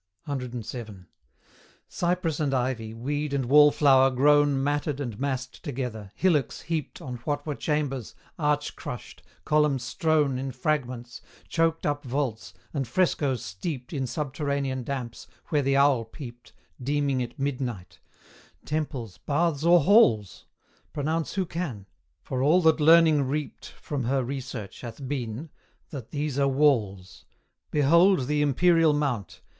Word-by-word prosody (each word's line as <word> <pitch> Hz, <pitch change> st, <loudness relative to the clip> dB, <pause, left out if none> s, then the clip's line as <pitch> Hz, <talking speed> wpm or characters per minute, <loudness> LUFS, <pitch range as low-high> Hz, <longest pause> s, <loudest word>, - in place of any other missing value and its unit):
CVII. 120 Hz, -7 st, -6 dB, 0.8 s
Cypress 175 Hz, -3 st, -1 dB
and 140 Hz, -3 st, 0 dB
ivy, 125 Hz, -3 st, -1 dB
weed 145 Hz, +6 st, -3 dB
and 135 Hz, -2 st, 0 dB
wallflower 140 Hz, -1 st, +6 dB
grown 145 Hz, +1 st, +3 dB
Matted 145 Hz, 0 st, -1 dB
and 120 Hz, -7 st, -5 dB
massed 130 Hz, -1 st, -3 dB
together, 120 Hz, -, -5 dB
hillocks 150 Hz, -10 st, +1 dB
heaped 165 Hz, +1 st, -4 dB
On 125 Hz, -4 st, -5 dB
what 145 Hz, +4 st, -3 dB
were 150 Hz, -, -2 dB
chambers, 140 Hz, -5 st, -2 dB, 0.2 s
arch 150 Hz, -1 st, 0 dB
crushed, 120 Hz, -4 st, -8 dB, 0.2 s
column 150 Hz, -2 st, +3 dB
strown 140 Hz, +2 st, 0 dB
In 135 Hz, 0 st, -3 dB
fragments, 125 Hz, -3 st, -2 dB, 0.3 s
choked 165 Hz, 0 st, 0 dB
up 145 Hz, -1 st, -1 dB
vaults, 130 Hz, -4 st, -3 dB, 0.2 s
and 135 Hz, -3 st, -2 dB
frescoes 135 Hz, -, 0 dB
steeped 125 Hz, -, -5 dB
In 135 Hz, -3 st, -2 dB
subterranean 140 Hz, -2 st, -2 dB
damps, 120 Hz, -3 st, -5 dB, 0.2 s
where 150 Hz, -2 st, +2 dB
the 135 Hz, 0 st, +2 dB
owl 140 Hz, -4 st, +4 dB
peeped, 120 Hz, -2 st, -11 dB, 0.3 s
Deeming 140 Hz, 0 st, 0 dB
it 120 Hz, -, -6 dB
midnight: 125 Hz, -9 st, -4 dB, 0.7 s
Temples, 140 Hz, -9 st, -4 dB
baths, 155 Hz, 0 st, 0 dB
or 170 Hz, 0 st, +6 dB
halls? 140 Hz, -, +3 dB, 0.5 s
Pronounce 155 Hz, +2 st, -2 dB
who 190 Hz, -2 st, 0 dB
can; 160 Hz, -, -5 dB, 0.4 s
for 130 Hz, -1 st, -3 dB
all 165 Hz, +6 st, +4 dB
that 160 Hz, 0 st, +4 dB
Learning 160 Hz, -1 st, +6 dB
reaped 140 Hz, +2 st, -3 dB
From 140 Hz, -5 st, -5 dB
her 135 Hz, +2 st, +1 dB
research 125 Hz, -5 st, -6 dB
hath 125 Hz, +3 st, -7 dB
been, 130 Hz, +2 st, -4 dB, 0.4 s
that 130 Hz, -7 st, -7 dB
these 145 Hz, -2 st, -2 dB
are 140 Hz, -, +3 dB
walls 115 Hz, -10 st, +1 dB, 0.4 s
Behold 170 Hz, +2 st, +4 dB
the 150 Hz, +2 st, 0 dB
Imperial 165 Hz, +2 st, +4 dB
Mount! 125 Hz, -, -2 dB
140 Hz, 130 wpm, -26 LUFS, 125-150 Hz, 0.8 s, wallflower